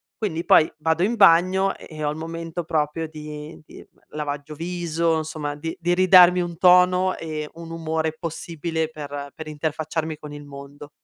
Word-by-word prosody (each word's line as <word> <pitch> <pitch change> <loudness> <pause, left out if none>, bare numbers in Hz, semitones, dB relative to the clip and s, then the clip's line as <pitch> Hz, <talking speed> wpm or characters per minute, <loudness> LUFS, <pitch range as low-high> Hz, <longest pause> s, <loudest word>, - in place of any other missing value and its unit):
Quindi 175 -6 -3
poi 155 - +5
vado 160 +2 0
in 230 +4 +1
bagno 190 0 +4
e - - -13
e 155 -1 -7
ho 145 - +1
il 150 - -6
momento 165 +1 -5
proprio 155 +1 -1
di 150 0 -9
di - - -13 0.3
lavaggio 145 0 -5
viso, 170 -1 -1
insomma 155 -2 -4
di 160 +3 -5
di 175 0 +1
ridarmi 180 -1 +7
un 170 -1 -5
tono 180 +1 +5
e 155 -2 -5
un 165 0 -10
umore 160 -1 -2
possibile 165 -1 -3
per 145 -2 -7
per 160 - -9
interfacciarmi 155 +1 -3
con 150 -1 -10
il 145 0 -9
mondo. 140 +1 -11
160 Hz, 170 wpm, -23 LUFS, 150-170 Hz, 0.3 s, ridarmi